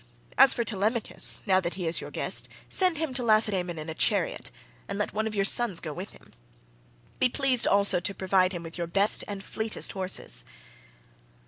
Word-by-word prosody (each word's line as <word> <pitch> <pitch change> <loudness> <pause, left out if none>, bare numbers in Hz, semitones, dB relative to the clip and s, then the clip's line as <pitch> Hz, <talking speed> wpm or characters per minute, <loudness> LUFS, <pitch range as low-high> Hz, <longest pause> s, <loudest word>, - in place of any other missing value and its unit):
As 270 0 +6
for 235 - -1
Telemachus, 220 +2 +1
now 190 -2 +3
that 175 -2 -4
he 180 -2 -5
is 165 - 0
your - - -8
guest, - - 0 0.2
send 365 -4 +1
him 315 -3 -3
to 255 - 0
Lacedaemon 210 -6 +1
in 155 +1 -7
a 160 - -5
chariot, - - -1 0.4
and 200 - -5
let 210 - -3
one 220 +1 -2
of 215 - -6
your 195 -1 +1
sons 205 -4 +4
go 155 -3 -7
with 185 +6 -7
him. - - -18 0.9
Be 255 - +3
pleased 260 -1 +2
to - - +2
also 200 -2 +3
provide 190 -1 0
him 175 -3 -6
with 165 +1 -9
your 170 - -3
best 200 +4 +2
and 200 -1 -6
fleetest 220 +2 -2
horses." 180 - -4
200 Hz, 195 wpm, -26 LUFS, 180-225 Hz, 0.9 s, As